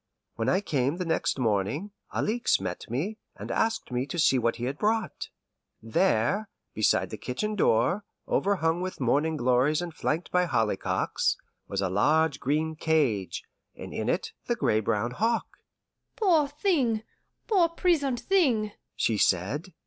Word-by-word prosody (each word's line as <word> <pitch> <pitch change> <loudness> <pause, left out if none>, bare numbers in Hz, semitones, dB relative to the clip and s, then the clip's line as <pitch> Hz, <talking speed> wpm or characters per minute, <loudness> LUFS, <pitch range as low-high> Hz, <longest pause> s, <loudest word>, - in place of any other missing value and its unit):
When 115 - -1
I 190 - +2
came 140 -4 0
the 180 - -3
next 165 -3 0
morning, 120 - 0 0.2
Alixe 235 +3 +1
met 95 +1 -5
me, 170 - -2 0.2
and - - -7
asked 225 - 0
me 125 +2 -1
to 145 - -5
see 135 -5 +4
what 115 0 +1
he 120 - -7
had 135 +4 -3
brought. 220 +1 -1 0.5
There, 185 - +1 0.2
beside 110 - +2
the - - -6
kitchen 210 +13 -3
door, 175 - +2 0.2
overhung 175 -4 +1
with 185 0 -4
morning 145 +5 +1
glories 130 +4 +2
and 175 -2 -4
flanked 160 +2 -2
by 180 0 +3
hollyhocks, 115 -9 0 0.3
was 100 0 -2
a 95 - 0
large 150 +8 +2
green 155 +4 0
cage, 140 - 0 0.3
and - - -8
in - - -2
it - - -1 0.2
the - - +1
gray 110 - +2
brown 110 +2 0
hawk. 225 - 0 0.7
"Poor 335 -9 +3
thing, 280 - +1 0.4
poor 365 -6 +3
prisoned 305 -8 +1
thing!" 245 - +2 0.2
she 110 -3 +1
said. 115 - +1
160 Hz, 150 wpm, -27 LUFS, -, 0.7 s, see